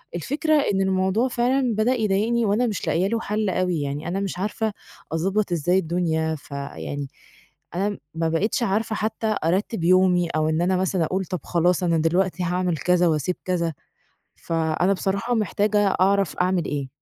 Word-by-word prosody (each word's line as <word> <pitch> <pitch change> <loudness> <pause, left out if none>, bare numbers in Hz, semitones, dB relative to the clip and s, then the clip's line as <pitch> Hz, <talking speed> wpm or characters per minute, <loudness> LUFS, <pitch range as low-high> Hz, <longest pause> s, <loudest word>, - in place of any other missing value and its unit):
الفكرة 300 - -1 0.2
إن 195 - +1
الموضوع 190 +5 +1
فعلًا 250 -1 +1
بدأ 220 +4 +2
يضايقني، 220 +1 +1
وأنا 220 +5 +2
مش 210 - -3
لاقية 180 +4 +2
له 230 +2 0
حل 210 -2 -1
أوي 180 -4 0
يعني، 145 +3 -4
أنا 185 +3 -1
مش 195 -2 -3
عارفة 215 +2 -2 0.4
أضبط 190 +4 0
إزاي 175 +3 +2
الدنيا، 160 -2 0
فيعني 140 0 -6 0.7
أنا 200 +2 -1 0.2
ما 165 0 0
بقيتش 205 +9 0
عارفة 220 +1 0
حتّى 215 0 -1
أرتّب 185 +2 0
يومي، 180 -1 +4
أو 155 0 0
إن 160 +1 0
أنا 180 +1 +2
مثلًا 185 -2 +1
أقول 190 +3 -2
طَب 180 +1 -4
خلاص، 175 +1 +1
أنا 170 -2 +2
دلوقتي 180 +3 +1
هاعمل 180 -1 0
كذا، 180 +1 +2
وأسيب 160 +3 0
كذا، 170 -3 0 0.6
فأنا 165 +3 0
بصراحة 195 +5 -1
محتاجة 210 0 +1 0.2
أعرف 195 -3 +2
أعمل 180 -1 +1
إيه. 140 -3 -3
185 Hz, 160 wpm, -23 LUFS, 165-210 Hz, 0.7 s, يومي